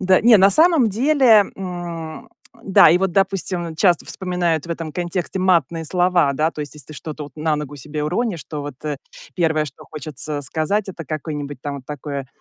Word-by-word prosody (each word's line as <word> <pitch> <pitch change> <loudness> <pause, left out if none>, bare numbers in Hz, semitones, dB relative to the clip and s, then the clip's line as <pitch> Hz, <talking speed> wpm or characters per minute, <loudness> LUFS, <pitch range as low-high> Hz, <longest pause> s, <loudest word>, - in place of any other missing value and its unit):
Да, 185 -1 +4
не, 230 -1 +7
на 195 +1 +6
самом 315 - +5
деле, 240 -2 +4
м, 175 -4 -6 0.3
да, 190 -5 +6
и 175 - +4
вот, 190 -2 0
допустим, 185 -4 -1
часто 175 -1 +3
вспоминают 175 -4 -1
в - - -8
этом 165 -2 -4
контексте 175 0 -3
матные 170 -3 +2
слова, 175 -3 +2
да, 155 +3 +1
то 155 - -8
есть 145 0 -6
если 150 -4 -11
ты 155 - -9
что-то 150 0 -7
вот 145 - -12
на 155 0 0
ногу 145 -1 -6
себе 150 +2 -5
уронишь, 185 - -1
то 150 -2 -6
вот, 145 -2 -6
э, 150 -2 -2 0.4
первое, 160 -3 +1
что 145 - -11
хочется 150 0 -5
сказать, 160 - -1
это 170 -4 -7
какое-нибудь 145 -2 -5
там 145 -1 -4
вот 130 -2 -11
такое, 140 -2 -5
165 Hz, 195 wpm, -20 LUFS, 150-190 Hz, 0.4 s, не